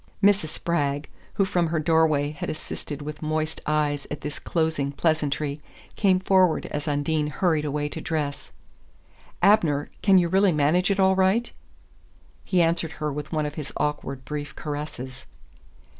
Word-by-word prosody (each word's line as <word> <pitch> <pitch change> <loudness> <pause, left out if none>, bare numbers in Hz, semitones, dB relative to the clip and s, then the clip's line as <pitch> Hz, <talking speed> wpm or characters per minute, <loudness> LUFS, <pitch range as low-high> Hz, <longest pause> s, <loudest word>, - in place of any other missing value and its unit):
Mrs. 200 -4 +4
Spragg, 145 -3 -1 0.3
who 195 - +3
from 175 -2 +1
her 160 0 -1
doorway 155 -2 +2
had 150 - -5
assisted 150 -1 -6
with 150 0 -7
moist 155 0 -2
eyes 150 -2 0
at 150 - -5
this 150 +1 -5
closing 160 -4 -1
pleasantry, 150 -1 0 0.3
came 190 -3 +3
forward 185 -3 +3
as 150 +1 -3
Undine 150 +1 0
hurried 155 -1 +1
away 145 0 -1
to - - -6
dress. 150 -3 -3 0.9
"Abner 170 -8 +4
can 195 -2 +5
you 175 -2 +4
really 190 +1 +3
manage 155 +6 +2
it 200 0 +1
all 190 0 +5
right?" 190 +5 +2 0.9
He 180 -3 +2
answered 165 -1 0
her 150 -1 -3
with 150 +1 -6
one 155 -2 0
of 145 - -4
his 150 -2 -6
awkward 140 -3 -2
brief 145 -1 -5
caresses. 140 -4 -6
155 Hz, 155 wpm, -25 LUFS, 145-175 Hz, 0.9 s, can